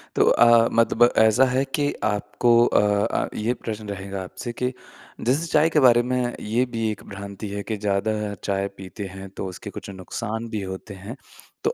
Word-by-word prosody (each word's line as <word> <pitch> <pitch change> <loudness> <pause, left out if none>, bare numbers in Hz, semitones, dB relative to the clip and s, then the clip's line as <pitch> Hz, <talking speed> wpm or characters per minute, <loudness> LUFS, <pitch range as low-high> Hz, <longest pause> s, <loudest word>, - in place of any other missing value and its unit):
तो - - +4
अ, 120 -1 +6
मतलब 115 0 +3
ऐसा 110 +4 +5
है 130 +1 +1
कि 145 -1 0
आपको 110 +3 +1
अ - - +3 0.3
अ, - - -1
ये 115 +3 0
प्रश्न 110 -3 -6
रहेगा 100 -1 -5
आपसे 120 +6 -7
के 125 0 0 0.5
जैसे 140 +7 +2
चाय 155 +1 +3
के 155 - +3
बारे 120 -3 +6
में 125 -1 -1
ये 115 +4 +1
भी 110 -1 0
1 105 - -8
भ्रांति 100 +1 -7
है 100 0 -4
कि 110 -2 -3
ज़्यादा 100 +1 0 0.3
चाय 100 0 0
पीते 95 +2 -7
हैं 95 +1 -9
तो - - -3
उसके 90 - -8
कुछ - - -8
नुकसान 110 +4 -5
भी 110 -3 -3
होते 95 +2 -7
हैं। 115 +5 -6 0.5
तो - - +1
110 Hz, 190 wpm, -24 LUFS, 100-120 Hz, 0.5 s, अ